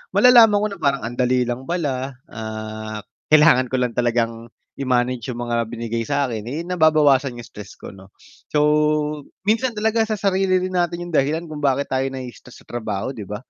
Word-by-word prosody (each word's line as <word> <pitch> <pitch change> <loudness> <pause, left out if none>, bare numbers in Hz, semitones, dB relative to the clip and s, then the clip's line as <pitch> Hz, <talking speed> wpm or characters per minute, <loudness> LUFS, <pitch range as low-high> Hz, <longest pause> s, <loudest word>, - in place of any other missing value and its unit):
malalaman 225 -2 +7
ko - - +2
na 200 - -8
parang 140 -3 0
ang 120 +2 -6
dali 125 0 +2
lang 125 +2 -5
pala, 140 -6 -2 0.2
ah, 110 -1 -6 0.2
kailangan 150 -4 +5
ko 130 - -3
lang 125 -2 0
talagang 115 -1 -1 0.3
i-manage 125 -3 0
yung 120 - -4
mga 120 -1 -1
binigay 115 0 -4
sa'kin 130 -7 -1
eh, 150 +7 -4
nababawasan 155 -7 +3
yung 120 - -8
stress 105 0 -11
ko - - -10
'no, 95 -1 -15 0.4
so 150 - 0 0.8
minsan 225 +4 +1
talaga 220 +2 0
sa 215 - -1
sarili 190 -2 +1
rin 185 -1 -1
natin 175 0 -1
yung 175 - -8
dahilan 155 +2 +1
kung 155 -3 -8
bakit 140 -1 0
tayo 130 0 0
na-i-stress 125 -2 -9
sa - - -29
trabaho, 110 -1 -3
di 110 -7 -8
ba? 105 - -5
130 Hz, 180 wpm, -21 LUFS, 115-170 Hz, 0.8 s, malalaman